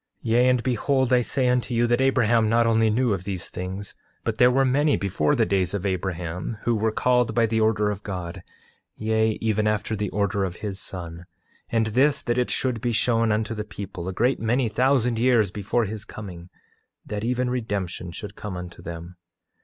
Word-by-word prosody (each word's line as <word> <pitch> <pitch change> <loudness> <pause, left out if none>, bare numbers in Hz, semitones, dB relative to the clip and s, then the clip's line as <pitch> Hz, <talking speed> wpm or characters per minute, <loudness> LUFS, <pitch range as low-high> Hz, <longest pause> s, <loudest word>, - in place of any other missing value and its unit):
8:18 110 - -1
Yea, 120 +2 +5
and 125 -2 +2
behold 130 +1 +1
I 125 - +5
say 130 +2 0
unto 125 0 +1
you, 120 +1 +3
that 120 +2 +2
Abraham 120 -4 +3
not 115 +1 +3
only 115 -1 +3
knew 120 +1 +2
of 95 -2 -3
these 95 -3 -4
things, 95 +2 -5 0.3
but 115 -1 -2
there 125 - +7
were 135 +2 +3
many 145 +3 +3
before 100 +9 +1
the 115 -4 +3
days 95 -2 0
of 100 0 -3
Abraham 90 +1 -3
who 120 - +2
were 110 +1 +1
called 125 0 +2
by 115 -1 +4
the 110 0 0
order 105 -1 +2
of 100 -1 -5
God; 90 -4 -5 0.6
yea, 110 0 +1
even 110 -1 +1
after 105 +1 0
the 105 -1 -2
order 100 0 0
of 90 -2 -3
his 100 -1 -5
Son; 85 -2 -8 0.4
and 115 -1 +2
this 140 +4 +3
that 120 +1 0
it 125 - 0
should 125 -4 -1
be 120 0 0
shown 115 0 +2
unto 110 +2 0
the 105 -1 -4
people, 95 -3 -7
a - - -1
great 120 +8 +1
many 120 +2 +1
thousand 125 0 +2
years 115 -5 +3
before 105 +4 0
his 105 +1 -5
coming, 90 -5 -9 0.6
that 105 0 -4
even 125 +1 0
redemption 100 -7 -3
should 100 +4 -8
come 105 -4 -6
unto 90 -1 -8
them. 85 +1 -8
110 Hz, 200 wpm, -24 LUFS, 100-120 Hz, 0.6 s, there